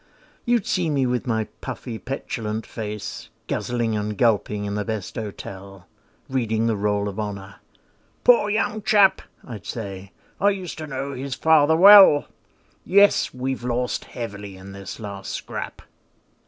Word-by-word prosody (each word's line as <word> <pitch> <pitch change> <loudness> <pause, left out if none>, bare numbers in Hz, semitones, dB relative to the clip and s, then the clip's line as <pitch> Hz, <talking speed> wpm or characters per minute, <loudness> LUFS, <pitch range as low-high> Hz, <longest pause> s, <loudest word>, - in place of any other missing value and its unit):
You'd 240 -4 +2
see 175 -3 0
me 140 -3 +1
with 125 +1 -1
my 110 -2 +1 0.2
puffy 125 -3 -6
petulant 110 -4 -4
face, 105 -2 -6 0.2
Guzzling 120 -2 -1
and 105 0 -3
gulping 105 -3 +1
in 100 - -3
the 105 0 -1
best 110 -2 -4
hotel, 100 -3 -8 0.4
Reading 115 -5 0
the 115 -1 +1
Roll 105 0 0
of 100 +1 -5
Honour. 100 -2 -6 0.7
"Poor 235 -4 +5
young 215 0 0
chap," 205 -2 +4 0.2
I'd 110 -5 -9
say 100 -4 -6 0.3
"I 200 - +4
used 185 -5 -4
to 155 - -6
know 135 0 -4
his 135 0 -4
father 160 -1 +4
well; 190 -4 +9 0.6
Yes, 200 +2 +4
we've 130 0 -4
lost 125 0 -2
heavily 100 -4 -7
in 95 +1 -11
this 100 +2 -8
last 100 -3 -6
scrap." - - -6
115 Hz, 145 wpm, -23 LUFS, 105-145 Hz, 0.7 s, well